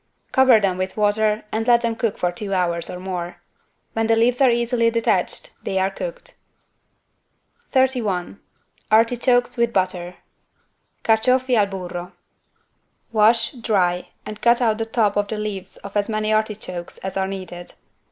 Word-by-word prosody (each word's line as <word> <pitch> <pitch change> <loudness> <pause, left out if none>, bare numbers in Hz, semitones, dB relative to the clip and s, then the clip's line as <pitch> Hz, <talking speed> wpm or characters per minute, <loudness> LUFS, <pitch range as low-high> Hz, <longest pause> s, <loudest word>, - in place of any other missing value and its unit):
Cover 260 -4 +6
them 190 -3 0
with 185 +2 -3
water 210 +1 +2
and 225 +2 -2
let 240 -1 +5
them 230 -1 -1
cook 225 -2 -1
for 180 - 0
two 195 +2 -4
hours 170 -2 0
or 180 - -6
more. 180 -2 -5 0.6
When 225 0 0
the 225 - +4
leaves 240 +3 +2
are 265 - +6
easily 235 0 +2
detached 230 - 0
they 190 - -3
are 190 +1 +1
cooked. - - -7 1.4
31 235 -9 0 0.5
ARTICHOKES 245 +3 +3
WITH 235 0 +2
BUTTER 185 -3 -1 0.9
(Carciofi 250 +3 +3
al 210 -3 +3
burro) 180 -2 -6 1.0
Wash, 225 +1 +4
dry 190 -8 0 0.2
and 215 0 -8
cut 235 0 +4
out 225 -3 +1
the 225 - -1
top 220 -3 +1
of 205 0 +1
the 220 - -4
leaves 210 -3 -5
of 200 0 -11
as 205 +1 0
many 215 0 0
artichokes 215 -5 -3
as 190 - -6
are 190 0 0
needed. 185 -2 -7
215 Hz, 150 wpm, -22 LUFS, 190-235 Hz, 1.4 s, Cover